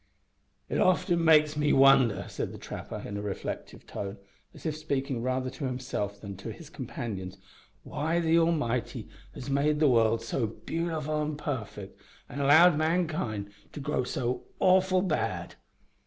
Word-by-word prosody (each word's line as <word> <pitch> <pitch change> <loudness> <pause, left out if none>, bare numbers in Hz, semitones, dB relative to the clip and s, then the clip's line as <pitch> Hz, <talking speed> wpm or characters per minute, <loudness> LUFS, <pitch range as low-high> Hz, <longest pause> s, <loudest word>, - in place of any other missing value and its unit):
"It - - -1
often 175 -2 +3
makes 155 -2 +5
me 150 0 +2
wonder," 130 -7 +5
said - - -4
the - - -9
trapper, - - -7
in 100 - -5
a - - -3
reflective 105 -1 -5
tone, 100 +1 -6 0.3
as - - -15
if 155 -2 -1
speaking 140 -5 -2
rather 130 +1 -1
to 140 - -5
himself 125 -6 -3
than 100 -2 -7
to - - -6
his - - -12
companions, 95 -5 -6 0.5
"why 160 +3 -1
the 165 0 +3
Almighty 150 -8 0 0.3
has 125 - -7
made 150 +2 +2
the 155 - +5
world 115 -3 +3
so 120 -5 -1
beautiful 155 +4 -3
an' 150 -1 -2
parfect 135 -8 -5 0.3
an' 140 - -6
allowed 155 +3 +6
mankind 155 - -1 0.2
to - - -6
grow 145 -2 -1
so 125 0 -2
awful 185 0 +4
bad." 170 -6 -2
140 Hz, 155 wpm, -29 LUFS, 120-160 Hz, 0.5 s, allowed